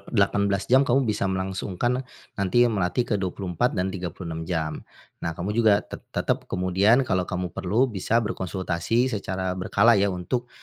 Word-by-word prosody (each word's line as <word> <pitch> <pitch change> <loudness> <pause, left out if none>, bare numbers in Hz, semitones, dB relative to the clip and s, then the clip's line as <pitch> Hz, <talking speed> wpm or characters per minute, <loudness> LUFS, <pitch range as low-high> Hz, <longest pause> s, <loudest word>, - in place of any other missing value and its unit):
18 100 -2 +1
jam 130 +6 +4
kamu 135 +2 +3
bisa 105 -3 0
melangsungkan, 95 +6 -1 0.3
nanti 100 +5 +2
ya 120 - +1
melatih 95 +4 0
ke 115 - -1
24 95 +4 -1
dan 95 +1 0
36 85 -2 -5
jam. 80 -3 -2 0.4
Nah 85 -1 -3
kamu 95 +4 -3
juga 110 -2 +3
te - - -9 0.2
tetap - - -1
kemudian 95 +7 +3
kalau 95 -6 0
kamu 90 -2 -3
perlu, 110 +8 +1
bisa 105 +3 0
berkonsultasi 95 +4 -1
secara 95 -2 -2
berkala 100 +4 +3
ya 100 - +3
untuk, 100 +7 -3
95 Hz, 160 wpm, -25 LUFS, 90-115 Hz, 0.4 s, jam